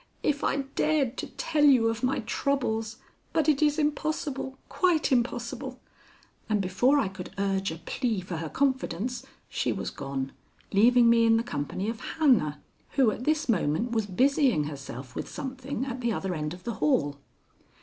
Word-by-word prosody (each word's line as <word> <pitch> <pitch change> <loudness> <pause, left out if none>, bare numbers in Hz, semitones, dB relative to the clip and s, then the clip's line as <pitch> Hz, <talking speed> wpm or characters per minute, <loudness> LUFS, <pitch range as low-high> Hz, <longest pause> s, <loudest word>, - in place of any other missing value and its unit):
"If 290 -1 0
I 280 - +1
dared 290 -5 +1
to - - -3
tell 310 -2 -1
you 260 -6 +6
of 225 0 -1
my 255 0 +1
troubles! 225 -3 -1 0.4
But 320 - +2
it 300 -2 +3
is 295 0 +3
impossible, 295 -3 -1
quite 345 -5 +2
impossible." 240 -1 -1 0.7
And 210 -1 +2
before 195 +9 +3
I 275 - +2
could 190 -1 -7
urge 195 -1 0
a 160 - -4
plea 220 - -2
for 175 -2 -5
her 160 -1 -4
confidence 255 - -1 0.2
she - - -1
was - - -3
gone, 135 -1 -4 0.4
leaving 235 +4 +6
me 230 0 +5
in 225 0 +5
the 230 - 0
company 185 +2 -3
of 225 0 -3 0.2
Hannah, 215 - +3 0.3
who 260 -6 +4
at 245 - -6
this 310 0 +1
moment 220 - +1
was 220 -3 0
busying 255 - +3
herself 140 -3 -7
with - - -5
something 265 -1 -4
at 255 -1 -5
the 235 -1 +1
other 190 -3 -2
end 150 0 -3
of 180 - -16
the 235 - -3
hall. 145 -1 +2
235 Hz, 170 wpm, -28 LUFS, 185-275 Hz, 0.7 s, you